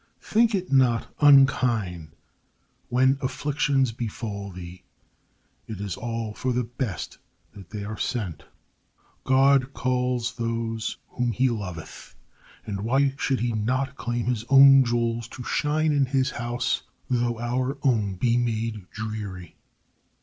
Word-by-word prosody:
] - - -42
Think 225 0 +2
it 185 -4 -3
not 125 -4 +2
unkind 120 - +3 0.7
when 130 +2 +3
afflictions 135 -1 0
befall 105 -3 -5
thee; 90 -1 -10 0.9
it 110 -4 -6
is 100 -3 -4
all 115 -2 -4
for 130 +3 -2
the 125 +1 0
best 120 - -5 0.3
that 95 -4 -13
they 105 0 -6
are 105 +1 -6
sent. 95 - -3 0.8
God 135 0 +4
calls 125 -1 -1
those 115 -1 -3
whom 120 -2 -1
he 130 +4 +2
loveth, 90 -8 -7 0.5
and 100 -2 -4
why 135 +5 +2
should 135 -4 0
he 120 0 0
not 130 +5 -1
claim 120 -3 -3
his 120 -2 -1
own 135 0 +8
jewels 115 -1 -1
to 125 - -9
shine 155 +4 +1
in 140 -2 +2
his 130 0 +1
house, 120 +1 -2 0.3
though 120 -2 0
our 125 +3 -1
own 110 -8 +1
be 120 +5 +1
made 115 -4 -2
dreary? 105 -5 -6
120 Hz, 135 wpm, -25 LUFS, 110-130 Hz, 0.9 s, own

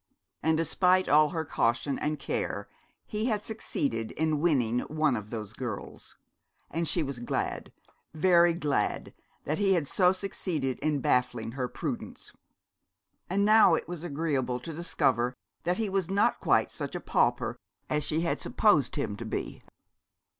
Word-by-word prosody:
And 160 0 +2
despite 180 +3 +3
all 150 +1 +5
her 160 -2 -3
caution 120 +1 0
and 150 +1 -1
care 470 - -3 0.4
he 215 0 -3
had 215 -4 0
succeeded 140 - -2
in 155 -1 0
winning 125 -8 +2
one 155 -1 0
of 105 -2 -5
those 110 -2 -5
girls: 115 -4 -6 0.6
and 165 +1 -1
she 170 - +1
was 140 -3 -5
glad, 120 - -3 0.4
very 170 +1 +4
glad, 150 -5 -1 0.3
that 155 - -1
he 195 -2 +4
had 165 -4 0
so 180 +5 +3
succeeded 180 -8 -3
in 150 -1 0
baffling 125 -3 +1
her 125 0 -2
prudence. - - -5 0.9
And 200 +3 +2
now 215 -5 +7
it - - -4
was 175 -1 -6
agreeable 140 -6 -1
to 160 - -6
discover 125 -6 +1 0.3
that 175 +1 +1
he 225 -1 0
was 190 -3 -1
not 200 +2 +2
quite - - +2
such - - -4
a - - -2
pauper - - +1 0.3
as 150 -1 0
she 155 +2 0
had 170 - -1
supposed 160 - +2
him 105 - -2
to - - -6
be. - - -4
155 Hz, 155 wpm, -29 LUFS, 130-180 Hz, 0.9 s, now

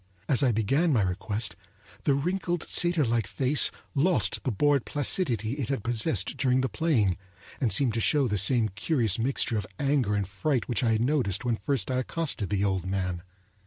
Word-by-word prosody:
As 135 -1 +3
I 130 -3 +3
began 135 - +1
my 115 -7 +2
request 100 +1 -2 0.5
the 140 - +3
wrinkled 175 +3 -2
satyrlike 135 - +2
face 130 +8 +3 0.2
lost 170 +6 +1
the 130 - -1
bored 140 +4 +2
placidity 130 - 0
it 135 -5 -4
had 135 -7 -2
possessed 110 -4 -1
during 130 -1 +2
the 130 - 0
playing, 120 - +1 0.4
and 120 -5 0
seemed 130 -5 +3
to 115 - -1
show 140 +2 +2
the 105 -3 0
same 110 +2 +3
curious 110 - +1
mixture 115 -2 0
of 100 - -6
anger 135 -7 +1
and 100 -2 -1
fright 125 +6 -2
which 120 - 0
I 115 -2 +2
had 110 - 0
noticed 125 -5 0
when 120 -2 +1
first 135 -5 -1
I 130 - 0
accosted 130 - -3
the 100 -1 0
old 95 -2 0
man. 90 -2 -2
120 Hz, 185 wpm, -27 LUFS, 105-140 Hz, 0.5 s, As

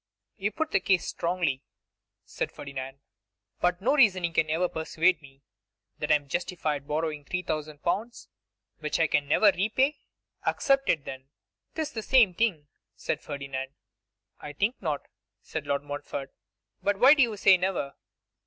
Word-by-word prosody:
'You 205 +2 -1
put 320 +5 -2
the 195 - +3
case 185 -1 +2
strongly,' 170 -6 -1 0.6
said - - -4
Ferdinand; 135 -1 -7 0.6
'but 180 +1 0
no 265 +5 +3
reasoning 185 - +4
can 155 -1 +2
ever 165 +3 +2
persuade 165 +1 +1
me 135 -1 -17 0.6
that - - -1
I - - +8
am 145 -1 -2
justified 160 -2 -2
in 140 - -26
borrowing 150 -1 -2
3,000L., 155 +7 -3 0.5
which 150 +1 -2
I 165 - +5
can 145 -2 +1
never 205 +8 +5
repay.' 260 +10 +1 0.4
'Accept 275 -1 +2
it, 150 -4 +2
then.' 130 0 -8 0.5
''Tis 315 -2 -2
the 225 - -4
same 230 -5 +5
thing,' 180 -7 0 0.3
said 150 - -3
Ferdinand. 140 -2 -5 0.6
'I 150 - -8
think 210 - -1
not,' 155 -6 -2 0.4
said - - -5
Lord 140 0 0
Montfort; 145 -1 -6 0.5
'but 200 0 +1
why 260 +7 +8
do 295 - +3
you 230 -4 +2
say 195 -1 +7
never? 180 -6 -1
170 Hz, 155 wpm, -28 LUFS, 145-205 Hz, 0.6 s, I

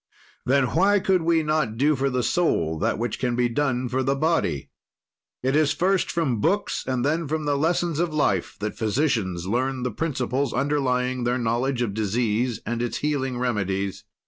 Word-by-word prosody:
"Then 135 +2 +4
why 200 +4 +4
could 190 -1 +2
we 165 -1 +2
not 150 -8 0
do 150 +4 +3
for 135 +1 0
the 125 -1 -1
soul 80 - +1
that - - 0
which 115 0 -3
can 125 -2 0
be 120 0 +2
done 125 0 0
for 130 +2 -1
the 135 +1 +1
body? 135 - 0 0.7
"It 130 +2 +1
is 155 0 +3
first 185 +4 +1
from 135 -10 0
books, 200 - 0
then 145 +6 0
from 155 +1 -2
the 145 -1 +1
lessons 165 +1 0
of 170 -1 0
life 105 - 0
that 105 0 -3
physicians 110 - 0
learn 125 +5 -1
the 125 - -1
principles 135 -4 -1
underlying 130 -2 0
their 120 +1 +1
knowledge 120 +2 0
of 105 -4 -2
disease 110 +2 0
and 120 +1 -2
its 120 - -2
healing 135 -4 -1
remedies. 100 -6 -2
130 Hz, 175 wpm, -24 LUFS, 120-150 Hz, 0.7 s, Then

